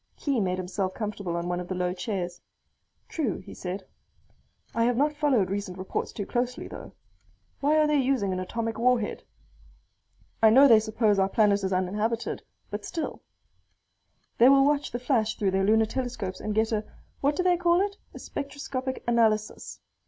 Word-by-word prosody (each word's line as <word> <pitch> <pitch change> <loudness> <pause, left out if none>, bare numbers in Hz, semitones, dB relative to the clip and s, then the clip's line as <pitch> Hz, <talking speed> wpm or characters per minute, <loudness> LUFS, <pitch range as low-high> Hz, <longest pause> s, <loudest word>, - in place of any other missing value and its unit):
Khee 275 -4 -1
made 185 -2 0
himself 185 +1 -3
comfortable 205 -5 -4
on 170 0 -3
one 175 0 -1
of 180 - -6
the 185 - -3
low 180 0 -1
chairs. 180 -2 -4 0.7
"True," 280 - -2
he 185 - -11
said. 185 +2 -5 0.9
"I 230 0 +2
have 245 0 +1
not 295 +3 +2
followed 275 -11 +1
recent 200 -2 -3
reports 190 0 -3
too 205 - -5
closely, 245 +3 -2
though. - - -10 0.7
Why 295 +2 +3
are 305 - +5
they 300 -1 +2
using 250 -8 +1
an 185 - -2
atomic 225 +4 -3
warhead? 240 -3 +1 1.2
I 220 - +7
know 270 +6 +8
they 225 -4 +7
suppose 215 -1 +1
our 190 0 +2
planet 205 -1 +3
is 190 - -1
uninhabited, 210 +5 -1 0.3
but - - -4
still 325 - -4 0.6
" - - -46
"They 245 +3 +8
will 275 0 +6
watch 290 0 +1
the 240 - -2
flash 240 -4 0
through 195 -2 0
their 195 0 +1
lunar 220 +2 +4
telescopes 220 -6 -4
and 210 -1 -3
get 220 +1 +2
a 215 -1 0 0.4
what 285 +1 +1
do 365 - 0
they 360 -1 +4
call 345 0 +3
it? 400 +1 0 0.2
a - - -11
spectroscopic 270 -2 -5
analysis. 220 -3 0
220 Hz, 180 wpm, -27 LUFS, 195-265 Hz, 1.2 s, know